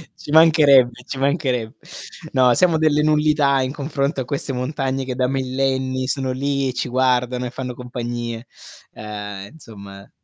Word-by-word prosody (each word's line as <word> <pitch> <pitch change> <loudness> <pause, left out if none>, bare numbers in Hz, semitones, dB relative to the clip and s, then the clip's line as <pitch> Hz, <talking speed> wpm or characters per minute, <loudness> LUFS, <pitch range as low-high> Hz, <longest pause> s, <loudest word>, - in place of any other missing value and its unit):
Ci 145 - -10
mancherebbe, 140 -6 +5
ci 135 - -6
mancherebbe. 135 -5 -1 0.6
No, 130 -2 +4
siamo 170 +5 +3
delle 155 -1 +2
nullità 150 -2 +2
in 130 0 -2
confronto 140 -1 -2
a - - -5
queste 135 +1 -4
montagne 135 +1 -2
che 130 -1 -4
da 125 0 +1
millenni 130 0 -1
sono 130 0 -1
lì 140 +1 -1
e - - -4
ci 125 +1 -3
guardano 125 0 +1
e - - -3
fanno 125 0 -5
compagnie, 120 -1 -5 0.5
ehm, 105 -2 -7
insomma 100 -9 -13
130 Hz, 150 wpm, -21 LUFS, 125-140 Hz, 0.6 s, mancherebbe